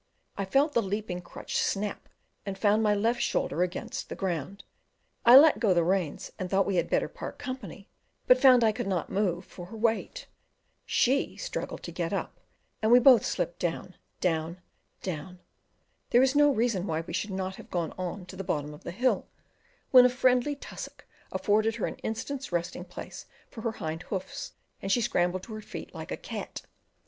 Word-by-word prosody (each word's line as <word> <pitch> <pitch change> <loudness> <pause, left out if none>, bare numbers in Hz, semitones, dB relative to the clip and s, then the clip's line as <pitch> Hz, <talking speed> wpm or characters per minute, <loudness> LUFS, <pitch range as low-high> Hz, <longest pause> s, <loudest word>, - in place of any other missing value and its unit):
I 195 - -2
felt 280 +9 +2
the 235 - +3
leaping 200 -3 -3
crutch 175 - -5
snap, 205 +1 -1 0.3
and 195 -1 -5
found 210 +2 +3
my 210 -1 +3
left 230 +4 +1
shoulder 170 - 0
against 180 0 -3
the - - -5
ground; 190 +1 -3 0.6
I 245 +2 +11
let 305 +2 +7
go 200 -6 +3
the 170 - +4
reins, 180 -3 -1
and 185 - -3
thought 195 0 +3
we 195 -2 0
had 170 -1 +1
better - - +1
part - - -8
company, 225 -7 -7 0.4
but 250 0 +5
found 255 -3 +7
I 220 - +5
could 210 - -4
not 185 -4 -2
move 185 -3 0
for 175 -1 -10
her 225 - -9
weight; 230 - -1 0.6
she 270 +3 +2
struggled - - -5
to - - -6
get - - -3
up, - - -3 0.4
and 220 +1 +2
we 245 - +9
both 250 -2 +7
slipped 170 - -2
down, 175 +1 -3 0.3
down 165 0 -1 0.4
down: 180 +1 -5 0.7
there 240 - +5
was 265 0 +4
no 290 0 +6
reason 225 -6 0
why 160 -1 -1
we 165 - -9
should 195 +4 -2
not 190 0 -3
have - - -12
gone 170 -3 -2
on 185 +1 -5
to 180 - -10
the 195 - -5
bottom 150 -4 -2
of 150 - -13
the - - -5
hill, 245 +9 0 0.6
when 255 -1 +10
a 250 - +6
friendly 255 +2 +2
tussock 280 - -9 0.3
afforded 210 +3 +2
her - - -1
an - - -5
instant's 260 +4 -4
resting 175 +1 -2
place 180 - -9 0.2
for 225 - -8
her 225 0 -2
hind 160 -4 -4
hoofs, 190 -2 -5 0.3
and 195 - -2
she 240 - +4
scrambled 185 -5 0
to 220 - -9
her 215 - -6
feet - - -8
like - - -8
a - - -2
cat. - - -7
195 Hz, 195 wpm, -28 LUFS, 180-240 Hz, 0.7 s, I